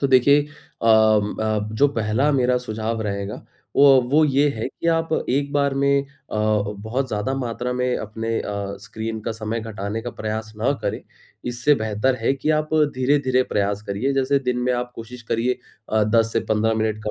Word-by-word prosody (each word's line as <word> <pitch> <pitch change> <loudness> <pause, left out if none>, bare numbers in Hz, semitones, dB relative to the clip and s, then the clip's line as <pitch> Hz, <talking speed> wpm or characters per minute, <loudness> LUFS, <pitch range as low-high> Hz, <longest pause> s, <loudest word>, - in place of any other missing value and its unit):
तो 140 - +2
देखिए 135 +2 +5 0.4
अम 110 -2 +4
अ, 110 -1 0
जो 140 +6 +4
पहला 115 +3 +1
मेरा 125 -2 +2
सुझाव 110 -1 -3
रहेगा 100 -1 -4 0.3
वो, 135 -2 +7
वो 145 +6 +3
ये 145 0 +3
है 115 -6 -3
कि 165 - -7
आप 165 0 +1 0.2
एक 140 +2 0
बार 140 -1 +1
में 140 0 +3
अ, 140 - -15 0.3
बहुत 110 +4 -1
ज़्यादा 105 +4 -2
मात्रा 125 -1 -3
में 125 0 0
अपने 115 +2 -3
अ, 100 -1 -4
स्क्रीन 110 +2 -5
का 115 +2 -3
समय 110 +1 -3
घटाने 110 -1 -4
का 120 - -4
प्रयास 110 -1 -5
न 120 - +2
करें। - - -2 0.5
इससे 120 +4 +2
बेहतर 110 +3 0
है 115 - +2
कि, 140 +3 -1
आप 155 0 +1 0.3
धीरे-धीरे 130 0 +2
प्रयास 100 -3 -1
करिए 110 +8 -1
जैसे 135 +1 +2
दिन 125 -2 -1
में 125 +1 +1
आप 125 0 -3
कोशिश 120 +2 -9
करिए 115 +2 -1 0.3
अ, 110 0 +2
10 115 +1 +2
से 115 - +1
15 110 +1 +2
मिनट 110 -1 -1
का - - 0
115 Hz, 185 wpm, -22 LUFS, 110-135 Hz, 0.5 s, वो